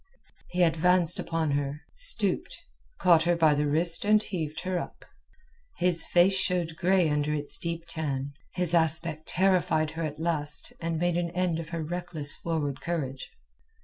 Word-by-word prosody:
He 180 0 +1
advanced 175 +1 +3
upon 165 -2 -2
her, 140 +1 -3
stooped, - - +4 0.4
caught 170 -2 +4
her 175 0 +2
by 160 -2 +3
the 145 0 0
wrist, 165 +3 +2
and 215 +1 +3
heaved 160 -5 -5
her 185 -1 -2
up. - - -9 0.7
His 175 -2 +4
face 180 +2 +4
showed 180 -4 -1
grey 180 0 +2
under 150 0 -1
its 145 -1 0
deep 170 0 -3
tan. 145 -4 -3 0.2
His 180 -2 -1
aspect 160 -1 0
terrified 180 -4 +1
her 165 - -6
at 150 -1 -5
last 160 -2 -1
and 165 -1 -2
made 175 +1 0
an 175 -1 -1
end 180 -3 -1
of 165 -1 -7
her 165 -1 -4
reckless 160 -3 -3
forward 150 -5 -4
courage. 140 -6 -4
165 Hz, 160 wpm, -27 LUFS, 155-175 Hz, 0.7 s, stooped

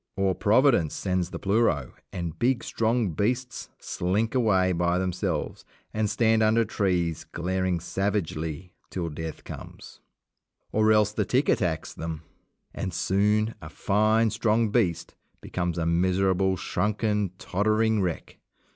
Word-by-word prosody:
Or 95 -1 +2
Providence 110 - +3
sends 90 -2 -1
the - - -6
pleuro, 100 - +1 0.2
and 85 -3 -5
big 125 0 +1
strong 115 -3 0
beasts 120 +8 -2
slink 100 +6 -1
away 100 -7 +3
by 85 0 +1
themselves, 90 -3 -2 0.3
and 110 -1 0
stand 110 +1 +3
under 110 +1 +3
trees 90 -6 0
glaring 90 0 -1
savagely 90 -3 -3 0.2
till 85 -3 -3
death 80 +1 -6
comes. - - -10 0.7
Or 110 0 +3
else 105 -1 +4
the 105 0 0
tick 130 +7 +1
attacks 85 -4 0
them, 80 -1 -6 0.5
and 95 - -3
soon 105 +3 +1
a 75 - -8
fine, 110 +5 +2
strong 115 0 +1
beast 100 -8 0 0.3
becomes 85 -2 -3
a 85 - 0
miserable, 95 +2 +2
shrunken, 105 -2 -1
tottering 110 +3 +1
wreck. 90 -3 -4
95 Hz, 130 wpm, -26 LUFS, 90-110 Hz, 0.7 s, else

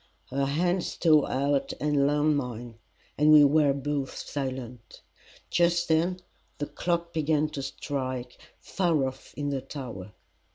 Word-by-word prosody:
Her 135 +1 0
hand 175 +5 +1
stole 155 -4 +3
out 140 +1 0
and 145 -2 +2
lay 145 - +2
on 150 +1 +3
mine, 120 -4 -5 0.4
and 150 +1 +5
we 150 -1 +9
were 145 0 +4
both 140 0 -3
silent. 130 -4 -6 0.5
Just 170 0 +2
then 170 +3 +2 0.4
the 145 - -2
clock 170 +2 -2
began 155 -1 +1
to 145 -2 -5
strike 130 -2 -4 0.2
far 170 -7 0
off 130 0 -9
in 145 0 -2
the 135 -2 -2
tower. 120 -8 -8
145 Hz, 140 wpm, -27 LUFS, 130-155 Hz, 0.5 s, we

